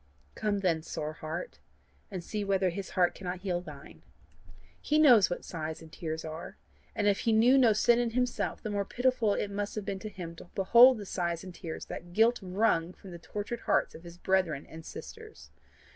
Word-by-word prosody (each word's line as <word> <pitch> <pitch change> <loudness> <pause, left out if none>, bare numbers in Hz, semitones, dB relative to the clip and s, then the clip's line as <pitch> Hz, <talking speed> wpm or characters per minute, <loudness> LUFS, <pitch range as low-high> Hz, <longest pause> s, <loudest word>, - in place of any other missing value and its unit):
"Come 205 -2 -1
then, 170 -4 +1
sore 155 -1 -5
heart, 155 - -6 0.5
and 185 -4 -6
see 210 +3 -3
whether 195 -2 +1
his 195 +2 -6
heart 180 -1 +4
cannot 180 -1 -6
heal 180 -3 -1
thine. 180 - -12 0.8
He 300 - +1
knows 250 - +7
what 175 - -4
sighs 160 -2 -5
and 160 -1 -13
tears 160 -1 -5
are, 160 +5 -7 0.4
and 210 - 0
if 200 -1 +3
he 230 - +1
knew 230 +4 +5
no 250 -4 +6
sin 235 +3 +4
in 240 -1 +1
himself, 250 +1 -1
the 215 - -3
more 200 -1 0
pitiful 245 -1 +1
must 205 +1 -4
it - - -1
have - - -13
been 195 0 -3
to 215 - -6
him 175 -4 -8
to - - -11
behold 235 +6 +7
the 205 - -7
sighs 170 -2 -2
and 185 -1 -9
tears 165 -2 -7
that 175 0 -8
guilt 230 +4 +4
wrung 185 -3 +1
from 190 - -13
the 170 - -9
tortured 210 +6 -5
hearts - - +1
of 165 - -12
his 170 0 -11
brethren 180 -6 0
and 160 0 -11
sisters. 445 -1 -10
195 Hz, 205 wpm, -30 LUFS, 175-225 Hz, 0.8 s, knows